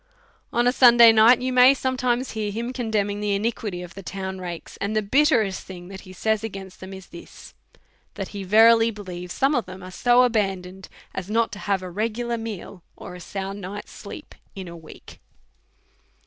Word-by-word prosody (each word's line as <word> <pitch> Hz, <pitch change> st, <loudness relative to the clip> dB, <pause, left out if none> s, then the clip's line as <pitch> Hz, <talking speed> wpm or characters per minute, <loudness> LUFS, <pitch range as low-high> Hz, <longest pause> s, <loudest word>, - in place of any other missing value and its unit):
On 240 Hz, +1 st, +1 dB
a 245 Hz, -, +4 dB
Sunday 240 Hz, -3 st, +8 dB
night 225 Hz, +3 st, +6 dB
you 255 Hz, 0 st, -1 dB
may 255 Hz, +2 st, +7 dB
sometimes 255 Hz, -1 st, -1 dB
hear 215 Hz, -2 st, -3 dB
him 235 Hz, +4 st, -4 dB
condemning 210 Hz, -5 st, -1 dB
the 205 Hz, -1 st, 0 dB
iniquity 205 Hz, -3 st, -3 dB
of 175 Hz, +1 st, -11 dB
the 195 Hz, -, -9 dB
town 190 Hz, +2 st, -6 dB
rakes; 175 Hz, -2 st, -7 dB
and 205 Hz, +2 st, -3 dB
the 215 Hz, -, +1 dB
bitterest 225 Hz, -, +2 dB
thing 180 Hz, -1 st, -10 dB
that 195 Hz, -1 st, -9 dB
he 185 Hz, -, -13 dB
says 220 Hz, +3 st, -1 dB
against 195 Hz, -3 st, -8 dB
them 190 Hz, +1 st, -9 dB
is 190 Hz, -1 st, -10 dB
this^ 170 Hz, -, -13 dB, 0.6 s
that 195 Hz, -2 st, -5 dB
he 200 Hz, -1 st, -6 dB
verily 225 Hz, +3 st, +5 dB
believes 180 Hz, -5 st, -8 dB
some 270 Hz, +8 st, +1 dB
of 245 Hz, -8 st, -1 dB
them 185 Hz, 0 st, -10 dB
are 185 Hz, -, -9 dB
so 245 Hz, +5 st, +4 dB
abandoned 190 Hz, -5 st, -2 dB, 0.2 s
as 190 Hz, 0 st, -6 dB
not 225 Hz, +1 st, +1 dB
to 205 Hz, -, -8 dB
have 195 Hz, -3 st, -1 dB
a 180 Hz, -, -7 dB
regular 230 Hz, +4 st, -2 dB
meal 205 Hz, -4 st, -7 dB
or 180 Hz, -, -10 dB
a 180 Hz, -, -9 dB
sound 195 Hz, +2 st, -6 dB
night's 200 Hz, +3 st, -7 dB
sleep -, -, -10 dB, 0.2 s
in 190 Hz, -2 st, -7 dB
a 170 Hz, -, -9 dB
week. 160 Hz, -2 st, -14 dB
205 Hz, 190 wpm, -23 LUFS, 190-230 Hz, 0.6 s, Sunday